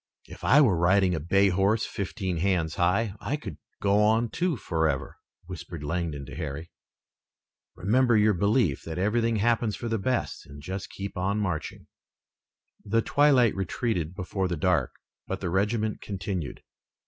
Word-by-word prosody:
"If - - -13
I 145 +3 +6
were 100 - +3
riding 95 +1 +3
a 80 - -1
bay 100 +6 +3
horse 100 +5 +2
fifteen 95 -3 -3
hands 85 -3 0
high 95 +4 +1
I 145 - -2
could 150 - -8 0.2
go 100 0 +3
on, 110 +2 +3
too, 175 -5 0
forever," 80 - -1 0.3
whispered 85 -3 -8
Langdon 80 -3 -3
to - - -9
Harry. 75 +1 -5 1.0
"Remember 115 +5 +3
your 105 0 +4
belief 100 - +1
that 80 0 -6
everything 115 +4 +1
happens 115 0 +1
for 120 - -5
the 115 -1 0
best 125 +5 -2
and 70 +1 -11
just 95 +7 -6
keep 100 +1 -7
on 95 +3 0
marching." 90 -7 -3 1.0
The 115 +2 +1
twilight 140 -6 +4
retreated 95 -2 -2
before 95 0 -2
the 85 -2 -2
dark, 90 +2 +1 0.4
but 95 - -3
the 90 -3 -3
regiment 105 +3 0
continued. 95 -6 -5
95 Hz, 155 wpm, -27 LUFS, 85-110 Hz, 1.0 s, I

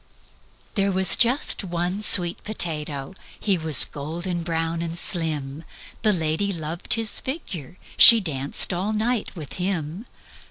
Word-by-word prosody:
"There 200 -2 -2
was 190 0 +4
just 245 -1 +1
one 175 +2 -6
sweet 180 -4 +4
potato. 150 -7 -5 0.3
He 200 -3 -1
was 160 -3 +7
golden 170 +5 -8
brown 165 0 -5
and 170 0 -7
slim: 155 -4 -5 0.4
The 215 - 0
lady 165 +2 -3
loved 165 0 +1
his 225 -2 0
figure. 185 - -9 0.2
She 230 -1 +9
danced 145 -2 0
all 190 +5 -5
night 225 +1 -4
with 155 -5 -11
him. 180 +2 -6
175 Hz, 130 wpm, -20 LUFS, 160-200 Hz, 0.4 s, She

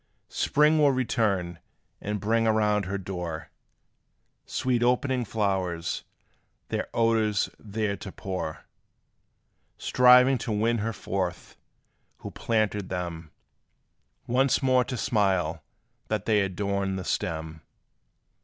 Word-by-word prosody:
_" - - -23
Spring 150 +2 +3
will 145 -2 +5
return, 100 -9 0 0.4
and 105 0 -3
bring 115 +3 +1
around 105 -2 +2
her 100 +2 -2
door 90 -4 -5 1.0
Sweet 125 -2 0
opening 125 +1 +1
flowers, 95 -6 -1 0.7
their - - -2
odors 110 -3 +1
there 105 -1 -2
to 95 - -8
pour, 90 -6 -5 1.1
Striving 125 +1 +5
to 110 - -4
win 115 +2 +1
her 110 +2 -1
forth, 95 -4 -4 0.6
who - - -8
planted 105 -4 -1
them, 85 -3 -4 1.0
Once 130 +3 +2
more 130 -1 +4
to 130 - -4
smile 95 -9 +1 0.5
that 105 -2 -2
they 105 -2 +3
adorn 100 0 -1
the 95 - -4
stem. 80 0 -3
105 Hz, 110 wpm, -27 LUFS, 95-115 Hz, 1.1 s, will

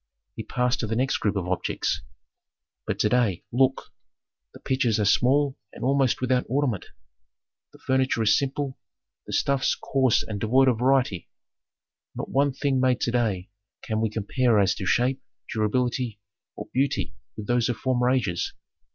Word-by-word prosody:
He - - -4
passed 125 0 -1
to 110 - -2
the 110 - -2
next 130 +3 +1
group 105 -1 -1
of 95 -3 -2
objects. 95 0 -1 0.9
"But - - -1
to 105 - +3
day, 110 -7 +1
look: 130 +2 +1 0.6
the - - -14
pitchers 125 -5 0
are 105 - +2
small 135 +6 +2
and - - -9
almost 135 -1 +2
without 125 0 +2
ornament, 130 -6 0 0.8
the - - -16
furniture 130 -3 +1
is 105 - +5
simple, 140 -1 -2 0.5
the - - -6
stuffs 140 -1 +1
coarse 130 -4 +1
and 105 -2 -5
devoid 130 +5 +4
of 115 -3 0
variety. 125 -7 +1 0.9
Not - - -5
one 140 +1 +2
thing 135 0 0
made 130 -1 +2
to 120 - 0
day 105 -7 -1 0.3
can 110 -1 -2
we 110 - +1
compare 115 +2 +1
as 100 -1 +3
to 95 - -5
shape, 130 +2 +1 0.3
durability, 120 0 -1 0.4
or - - -7
beauty 135 +2 0 0.2
with 105 - -6
those 120 +1 +1
of 120 - -1
former 125 -1 +1
ages. 110 -10 0
125 Hz, 160 wpm, -25 LUFS, 110-130 Hz, 0.9 s, is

